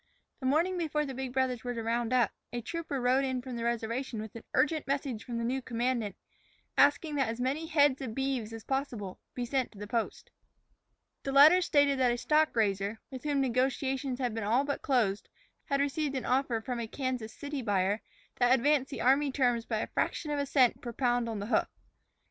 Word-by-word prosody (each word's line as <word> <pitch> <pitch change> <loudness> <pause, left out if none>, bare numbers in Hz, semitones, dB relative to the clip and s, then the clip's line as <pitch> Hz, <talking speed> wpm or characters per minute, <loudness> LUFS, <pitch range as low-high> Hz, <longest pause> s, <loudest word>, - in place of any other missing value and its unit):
The 260 - -2
morning 340 +6 +2
before 305 -2 0
the 270 - -5
big 260 0 -4
brothers 255 -2 0
were 245 -1 -3
to 230 - -3
round 235 +1 -1
up, 245 -5 +3 0.2
a 240 - -3
trooper 305 +2 -4
rode 255 +2 +3
in 260 -1 -1
from 250 0 -6
the 235 - -4
reservation 235 +1 -2
with 220 0 -7
an 230 - -8
urgent 305 -1 +2
message 270 -5 -2
from 240 -1 -5
the 230 - -2
new 260 +3 -1
commandant, 235 -4 -1 0.6
asking 290 +2 +4
that 265 -5 +1
as 230 +1 -4
many 280 +6 -1
head 290 -4 +3
of 230 -5 -5
beeves 265 -5 -1
as 225 -1 -8
possible 245 -8 -3 0.2
be 245 - -2
sent 260 0 -1
to - - -15
the 205 - -6
post. 225 +1 -3 0.9
The 275 - -3
letter 300 +7 +8
stated 285 -5 +3
that 255 -1 +4
a 240 - -1
stock 305 +3 +2
raiser, 205 -1 0
with 260 +2 -8
whom 285 -2 +1
negotiations 265 +1 0
had 250 -3 -1
been 225 -1 -3
all 235 +6 +2
but 285 0 -3
closed, 220 -7 +1 0.4
had 280 -2 0
received 285 0 0
an 260 - -3
offer 250 -3 +1
from 245 +1 -4
a 230 - -3
Kansas 255 -3 -3
City 285 +1 -5
buyer 205 -1 +1 0.4
that 245 +1 +5
advanced 270 +1 +2
the - - -5
army 275 +3 +3
terms 245 -4 +1
by 220 - -1
a - - -3
fraction 300 - -1
of 290 - 0
a 280 - -1
cent 260 -3 +3
per 240 -2 -6
pound 245 -1 +1
on 225 - -3
the 200 - -4
hoof. 225 - +2
255 Hz, 215 wpm, -30 LUFS, 230-275 Hz, 0.9 s, letter